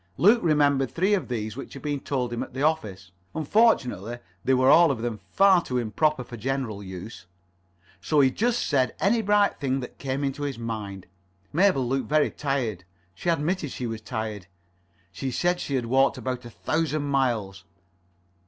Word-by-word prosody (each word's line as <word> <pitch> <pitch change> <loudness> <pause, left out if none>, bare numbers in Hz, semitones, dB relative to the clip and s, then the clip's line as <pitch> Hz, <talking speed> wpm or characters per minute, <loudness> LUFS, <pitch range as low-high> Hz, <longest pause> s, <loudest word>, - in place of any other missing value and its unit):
Luke 215 +6 +6
remembered 145 -5 +3
three 190 +5 +1
of 200 - 0
these 110 -3 -3
which 135 - -8
had 135 - -9
been 145 -1 -1
told 125 -4 -2
him 120 - -3
at - - -7
the 135 - -2
office. 105 - -1 0.2
Unfortunately 140 - +2 0.3
they 130 - +3
were 130 +1 +5
all 170 0 +7
of 120 -4 -2
them 115 -3 -3
far 195 -2 +5
too 125 -7 -3
improper 125 +5 0
for 120 0 -9
general 125 -3 -3
use. 95 +1 -9 0.7
So 150 +10 +1
he 135 -2 +5
just 240 - 0
said 130 -3 +1
any 225 +4 +2
bright 205 -1 +2
thing 135 -2 0
that 125 - -9
came 135 +1 -2
into 135 +1 -2
his 140 -3 -3
mind. 105 -5 -5 0.5
Mabel 165 -7 +3
looked 135 +1 -1
very 150 0 +3
tired. 125 -10 -2 0.3
She 85 - -3
admitted 165 0 0
she 125 - -5
was 115 -1 -4
tired. 110 -3 -5 0.6
She 130 +7 -4
said 175 +7 0
she 140 - -3
had 125 -2 0
walked 135 +3 +3
about 125 -1 -4
a - - -8
thousand 155 +3 -1
miles. 120 -9 -1
135 Hz, 180 wpm, -26 LUFS, 115-155 Hz, 0.7 s, all